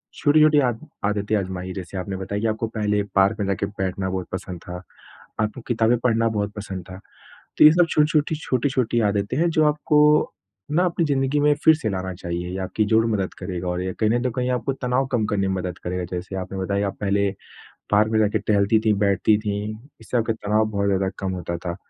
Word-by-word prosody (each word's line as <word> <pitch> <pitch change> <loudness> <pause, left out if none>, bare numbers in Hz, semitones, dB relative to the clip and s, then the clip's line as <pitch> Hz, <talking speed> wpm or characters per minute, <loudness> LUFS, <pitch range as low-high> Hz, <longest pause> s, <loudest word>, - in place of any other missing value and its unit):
छोटी-छोटी 150 0 +4
आद 120 -3 0 0.3
आदतें 105 +1 0
आज़माई, 95 -1 -4
जैसे 95 0 -7
आपने 95 +1 -4
बताया 100 +2 -4
कि 115 - +1
आपको 110 +1 -1
पहले 105 -2 0
पार्क 95 +1 +3
में 100 - 0
जाके 100 0 -1
बैठना 95 -1 -3
बहुत 95 -1 -3
पसंद 90 -2 -5
था, 90 0 -7 0.6
आपको 110 +4 -2
किताबें 115 0 +2
पढ़ना 115 -2 +2
बहुत 105 -2 -2
पसंद 95 -3 -6
था। 95 +1 -9 0.6
तो - - +7
ये 150 - +11
सब 175 0 +4
छोटी-छोटी 150 0 +2
छोटी-छोटी 130 -4 0
आदतें 105 +2 0
हैं, 170 +2 +3
जो 155 -1 +3
आपको 150 0 +3 0.4
ना 175 +4 +3
अपनी 170 -1 0
ज़िंदगी 135 0 +1
में 150 0 +4
फिर 160 -1 +8
से 145 -8 -3
लाना 95 -1 -3
चाहिए, 85 0 -4
ये 95 - -4
आपकी 105 +3 -1
ज़रूर 110 +1 +3
मदद 95 -3 -2
करेगा 90 -1 -4
और 90 +1 -2
ये 95 0 -3
कहीं 110 -1 +3
नहीं 120 +1 +1
तो 125 - 0
कहीं 125 +2 -2
आपको 125 +2 -1
तनाव 130 0 -1
कम 115 -3 +1
करने 100 -2 0
में 95 - 0
मदद 90 -1 -4
करेगा। 90 0 -2
जैसे 90 +2 -5
आपने 95 +1 -6
बताया 100 +2 -1
आप 95 - -7
पहले 100 -1 +1 0.6
पार्क 105 +2 +3
में 110 - +2
जाके 105 0 +2
टहलती 105 +1 +2
थीं, 110 -1 +2
बैठती 100 +1 +3
थीं, 105 0 -3 0.3
इससे 120 +2 -2
आपका 115 -1 +1
तनाव 110 0 +1
बहुत 100 0 -1
ज़्यादा 95 -1 +1
कम 95 -1 -2
होता 85 -1 -4
था, 85 0 -5
105 Hz, 215 wpm, -23 LUFS, 95-125 Hz, 0.6 s, ये